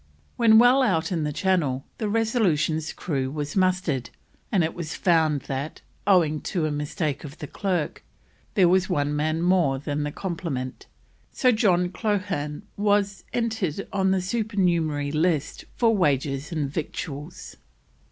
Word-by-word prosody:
When 225 -2 +6
well 245 +4 +6
out 180 -10 +1
in 165 -4 0
the 150 - -1
Channel 150 -7 0
the 215 - -1
Resolution's 185 - +1
crew 135 -6 -2
was 145 +1 -4
mustered, 185 - +1 0.4
and 195 -6 +3
it 160 - -1
was 170 -3 -5
found 160 -5 +2
that, 140 +3 -5 0.3
owing 165 -6 +4
to 170 -4 -1
a 155 - -1
mistake 150 0 -2
of 150 +1 -9
the - - -6
clerk, 175 +1 -2 0.5
there 190 -5 +5
was 185 +2 +3
one 145 -4 0
man 155 +2 0
more 175 -7 +3
than 145 +1 -3
the 150 0 -2
complement, 165 -8 -4 0.4
so 255 - +3
John 185 -6 +2
Coghlan 185 -6 -2
was 205 -1 +1
entered 215 -7 -2
on 190 -1 +2
the 190 -1 +2
Supernumerary 180 -8 0
List 155 -1 0
for 230 -2 +3
Wages 145 -3 0
and 155 -4 -1
Victuals. 150 +1 -6
170 Hz, 145 wpm, -25 LUFS, 150-195 Hz, 0.5 s, When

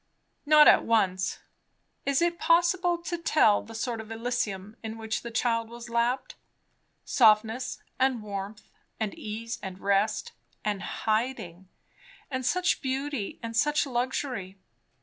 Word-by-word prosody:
Not 300 0 +8
at - - +7
once. 190 -5 +1 0.7
Is 280 +3 +3
it 345 0 0
possible 345 +1 +3
to 345 0 -3
tell 305 -10 +4
the 225 - -11
sort 230 0 -2
of 220 - -12
Elysium 225 -3 -3
in 220 0 -6
which 220 0 -3
the 235 - -6
child 230 -1 0
was 235 0 -10
lapped? 245 - 0 0.7
Softness 225 +1 +3 0.2
and 260 -4 +2
warmth 205 +1 -6 0.4
and 215 -2 -2
ease 225 +2 -6
and 190 -2 -6
rest, 200 +2 +1 0.3
and 205 -2 -1
hiding, 215 -6 -2 0.6
and 260 -1 -2
such 360 +8 +1
beauty 265 -4 -3
and 230 0 -5
such 295 +5 +2
luxury! 245 -6 -3
230 Hz, 130 wpm, -28 LUFS, 215-265 Hz, 0.7 s, Not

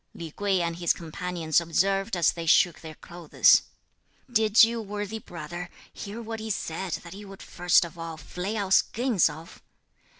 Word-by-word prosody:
Li 165 -2 -8
Kuei 195 0 0
and 170 0 -3
his 170 -1 +2
companions 170 -1 -2
observed 195 +4 0
as 170 - +3
they 165 -1 -7
shook 175 +1 +4
their 160 -1 -9
clothes, 170 -1 +3 0.7
"Did 220 -1 +5
you, 230 +1 +1
worthy 205 +1 -5
brother, 175 -1 -8 0.2
hear 205 +2 -7
what 225 0 -6
he 220 0 -6
said 185 -2 -3
that 170 0 -10
he 205 +2 -10
would 195 -1 -11
first 175 0 +2
of 170 0 -12
all 165 -1 -6
flay 180 +8 -5
our 200 -2 -3
skins 230 -1 +3
off! 160 +3 -11
180 Hz, 170 wpm, -26 LUFS, 170-205 Hz, 0.7 s, Did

